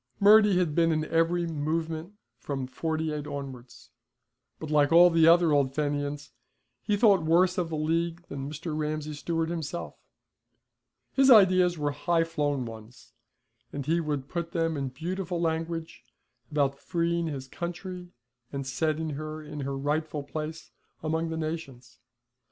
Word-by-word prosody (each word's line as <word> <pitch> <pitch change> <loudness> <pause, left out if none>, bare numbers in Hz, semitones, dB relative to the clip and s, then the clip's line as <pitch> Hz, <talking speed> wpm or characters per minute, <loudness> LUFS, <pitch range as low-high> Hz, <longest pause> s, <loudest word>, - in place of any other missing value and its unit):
Murty 210 -1 +6
had 175 -5 +1
been 165 +1 +3
in 155 -1 0
every 165 +2 +1
'movement' 160 +3 -3 0.3
from 135 +1 -4
the 130 - -14
'48 155 -1 -2
onwards. 135 -4 -8 0.7
But 155 -1 -6
like 145 -1 +3
all 175 +1 +8
the 165 -1 +5
other 170 -1 +6
old 140 -2 +2
Fenians, 145 -1 -2 0.5
he 210 -1 0
thought 200 -4 +5
worse 175 +3 +3
of 170 -2 -1
the 160 - -3
League 165 +2 -1
than 140 0 -5
Mr. 155 +1 -5
Ramsay 155 0 -3
Stewart 165 +2 -2
himself. 170 0 -5 1.2
His 270 0 +4
ideas 185 -6 +6
were 145 -1 -1
high 165 +3 +1
flown 145 -5 -1
ones, 115 +1 -12 0.6
and 140 -2 -5
he 165 +3 +1
could 145 -4 -3
put 170 0 -4
them 165 -1 0
in 140 -2 -2
beautiful 175 +6 -4
language, 165 -3 -3 0.5
about 140 -2 0
freeing 170 0 -1
his 135 -4 -5
country, 180 +3 -6 0.4
and 140 -1 -4
setting 155 +3 -1
her 155 +2 -6
in 150 0 -8
her 135 0 -3
rightful 150 +1 -2
place 155 +2 -6 0.3
among 160 +1 -1
the 160 - -3
nations. 140 -7 -6
160 Hz, 150 wpm, -28 LUFS, 145-170 Hz, 1.2 s, all